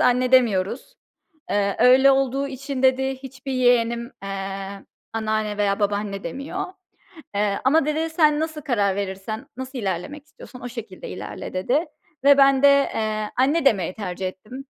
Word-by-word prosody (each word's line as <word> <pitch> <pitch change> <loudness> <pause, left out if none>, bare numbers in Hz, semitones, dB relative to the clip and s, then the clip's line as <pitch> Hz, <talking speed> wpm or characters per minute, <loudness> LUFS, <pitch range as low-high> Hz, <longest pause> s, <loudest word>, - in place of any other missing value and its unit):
anne 250 +1 +2
demiyoruz. 240 - +2 0.6
Eee, 200 -1 +1
öyle 260 +3 +7
olduğu 270 +1 +1
için 275 0 -5
dedi, 265 0 +3
hiçbir 265 +1 -8
yeğenim, 240 -1 +2
eee, 195 0 -5 0.3
anneanne 215 -1 -1
veya 200 0 +1
babaanne 205 -1 -1
demiyor. 275 - -4 0.7
Eee, 205 -1 +1
ama, 285 +4 +4
dedi, 315 +2 -1
sen 305 -2 +3
nasıl 315 -1 -3
karar 205 -9 +1
verirsen, 200 +5 -5
nasıl 260 +1 -6
ilerlemek 200 - -4
istiyorsan 270 -3 -13
o 245 - -5
şekilde 230 -6 -8
ilerle, - - -7
dedi. 250 - +1 0.4
Ve 280 0 +7
ben 275 -1 +5
de, 285 - +9
eee, 215 -6 +1
anne 280 +5 +2
demeyi 190 -8 +2
tercih 190 -2 -4
ettim. 215 +9 -9
245 Hz, 145 wpm, -23 LUFS, 205-275 Hz, 0.7 s, de